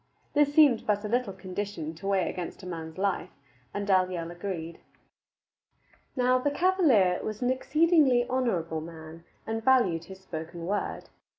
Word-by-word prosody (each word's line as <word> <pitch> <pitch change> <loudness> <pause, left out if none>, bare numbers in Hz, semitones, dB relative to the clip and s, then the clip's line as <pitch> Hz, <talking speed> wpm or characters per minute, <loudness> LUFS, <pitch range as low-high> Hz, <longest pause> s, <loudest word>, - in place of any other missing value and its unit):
This 290 -1 +3
seemed 290 -6 +5
but 210 0 +1
a - - -1
little 240 -1 0
condition 185 -3 -5
to 170 +4 -8
weigh 195 -2 +2
against 180 +2 -6
a - - -8
man's 160 -2 -6
life, 195 -1 -1 0.4
and 205 0 -3
Dalyell 185 -3 +1
agreed. 175 -2 -5 1.4
Now, 255 -1 +3
the 290 - +1
cavalier 285 - +3
was 215 +2 -4
an 245 - +2
exceedingly 285 -3 +3
honorable 180 -11 -1
man 160 0 -10 0.2
and 225 0 -3
valued 210 -11 +3
his 190 0 -11
spoken 170 -2 -7
word. 205 +3 -3
200 Hz, 150 wpm, -28 LUFS, 170-250 Hz, 1.4 s, seemed